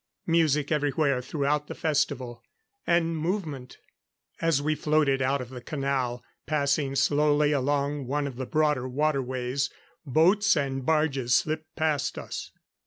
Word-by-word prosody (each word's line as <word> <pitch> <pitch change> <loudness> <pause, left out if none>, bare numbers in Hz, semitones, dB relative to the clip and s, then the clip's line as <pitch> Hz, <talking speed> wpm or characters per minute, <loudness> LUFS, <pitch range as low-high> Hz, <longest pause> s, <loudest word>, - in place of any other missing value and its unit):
Music 155 -3 +2
everywhere 145 -3 +1
throughout 145 +2 -1
the - - -6
festival. 140 -6 -1 0.5
And 170 -1 +2
movement. 155 -6 -3 0.6
As 165 -4 +2
we 155 +2 0
floated 150 -3 +1
out 135 +1 +1
of 125 0 -8
the 125 -1 -8
canal, 135 -3 -2 0.2
passing 140 -2 0
slowly 145 +2 +3
along 140 0 0
one 145 +2 -1
of 135 -3 -5
the 130 -1 -4
broader 150 -4 +1
waterways, 130 -2 -1 0.3
boats 175 +7 +3
and 135 -2 -1
barges 140 -5 +2
slipped 155 0 -1
past 155 -3 0
us. - - -6
145 Hz, 130 wpm, -27 LUFS, 135-155 Hz, 0.6 s, slowly